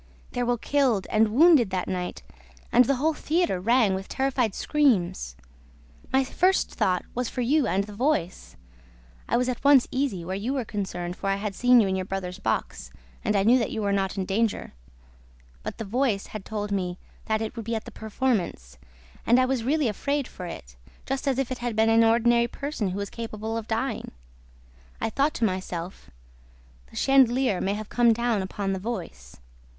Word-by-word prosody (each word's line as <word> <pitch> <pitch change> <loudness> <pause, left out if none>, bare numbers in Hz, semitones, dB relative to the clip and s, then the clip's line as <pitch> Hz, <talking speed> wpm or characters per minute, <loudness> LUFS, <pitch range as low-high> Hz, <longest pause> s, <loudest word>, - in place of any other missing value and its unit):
There 245 -1 -2
were 245 0 +1
killed 250 -6 +1
and 220 +1 +4
wounded 280 - +5
that 185 -1 -2
night 180 -1 -4 0.5
and 245 +1 +6
the 275 - +2
whole 310 +5 +1
theater 315 - 0
rang 225 0 +3
with 190 +1 -4
terrified 255 -6 0
screams. 225 - +1 0.8
My 265 +1 +3
first 365 +8 +1
thought 185 -5 0
was 250 -1 -2
for 250 - -3
you 275 +4 +2
and 195 +2 +1
the 210 +1 -10
voice. 195 - -1 0.7
I - - +3
was 250 +1 +1
at 250 -2 -3
once 280 -3 +6
easy, 255 -10 -1
where 185 +2 -3
you 220 +7 -2
were 260 -4 -2
concerned, 185 -4 -4
for 195 - -2
I 195 - +2
had 200 0 -4
seen 245 +4 +5
you 210 - +3
in 190 - 0
your 185 0 -2
brother's 185 -1 -5
box 65 - -2 0.3
and 210 - +1
I 195 - +3
knew 240 +5 +5
that 230 - -1
you 220 - -3
were 200 - +1
not 195 0 -1
in 190 - -1
danger. 210 +3 -1 0.9
But - - -6
the 225 - -5
voice 225 -1 0
had 215 -3 -8
told 210 -1 -4
me 180 -3 -2 0.3
that 220 -1 0
it 220 +1 -4
would 230 -3 -6
be 230 +1 -2
at 220 - -4
the 235 - -9
performance 215 - -2 0.4
and 240 +2 +4
I 255 - +4
was 255 -3 -1
really 290 +2 +1
afraid 280 +5 -1
for 180 - -8
it, - - -9 0.3
just 270 +1 -3
as 265 -2 +1
if 270 -2 -1
it 255 - -3
had 240 -2 -3
been 220 +1 +3
an 225 0 +5
ordinary 235 +1 +4
person 275 -7 -3
who 185 - -4
was 200 0 -4
capable 225 -1 -5
of 225 -1 -4
dying. 225 +4 -2 0.9
I 225 - -2
thought 280 +6 +1
to 230 - +1
myself, 185 - -4 0.8
'The - - -17
chandelier 260 -6 +3
may 195 +1 0
have 215 0 -7
come 240 -2 +4
down 235 -2 0
upon 195 +1 -3
the 190 - -3
voice.' 185 - -6
225 Hz, 195 wpm, -26 LUFS, 195-255 Hz, 0.9 s, and